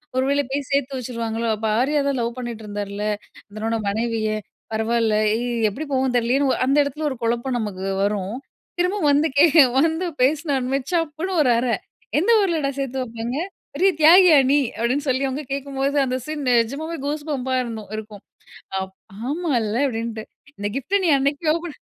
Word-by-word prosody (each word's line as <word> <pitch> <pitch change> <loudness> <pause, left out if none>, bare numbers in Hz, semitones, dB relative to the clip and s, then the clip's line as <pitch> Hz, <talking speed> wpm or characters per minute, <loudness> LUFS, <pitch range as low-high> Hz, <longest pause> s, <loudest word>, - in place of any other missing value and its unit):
ஒருவேள 270 +2 +2
போய் 280 -1 -2
சேர்த்து 275 -1 0
வச்சுடுவாங்களோ, 230 -2 -3
அப்போ 220 +1 -3
ஆர்யா 290 +4 +2
தான் 280 -1 0
லவ் 235 0 -2
பண்ணிட்டு 235 -3 -6
இருந்தார்ல? 205 0 -4 0.5
தன்னோட 225 +1 -1
மனைவிய. 220 +1 -1 0.4
பரவாயில்ல 220 0 +1 0.2
எ - - -3 0.3
எப்டி 235 +10 -6
போகும்னு 260 -1 +1
தெரியலையேன்னு, 260 +3 +2
அந்த 275 +3 +2
எடத்ல 290 +2 -4
ஒரு 265 - -4
குழப்பம் 240 +2 0
நமக்கு 200 -4 -4 0.2
வரும். 200 0 -1 0.4
திரும்பவும் 360 -3 +2
வந்து 295 +3 +3
கே 305 - +8 0.4
வந்து 325 +3 +1 0.2
பேசுநோன்மே 275 -2 +1
சப்புன்னு 330 +2 -1
ஒரு 260 - +3
அறை, 235 -1 +1 0.4
"எந்த 365 - 0
ஊர்லடா 325 -8 0
சேர்த்து 265 -1 -2
வைப்பாங்க? 235 +2 -5 0.4
பெரிய 370 +7 +4
தியாகியா 335 0 +8
நீ?" 285 - +5 0.2
அப்டீன்னு 260 +5 0
சொல்லி 260 +1 +1
அவங்க 275 +3 -4
கேட்கும்போது, 275 0 -2
அந்த 255 0 -1
சீன் 305 -2 -4
நிஜமாவே 275 +8 0
கூஸ் 295 +1 -3
பம்பா 260 -2 -1
இருந்தும் 220 -4 -7
இருக்கும். 210 -2 -9 0.6
அப் 190 0 -6 0.4
ஆமால்ல 265 -10 0
அப்டின்ட்டு. 225 -2 -4 0.3
இந்த 205 0 -2
கிஃப்ட்ட 375 +10 0
நீ 340 - +3
அன்னைக்கே 285 +3 0
ஓப்பன் 335 -2 -7
260 Hz, 155 wpm, -22 LUFS, 230-295 Hz, 0.6 s, கே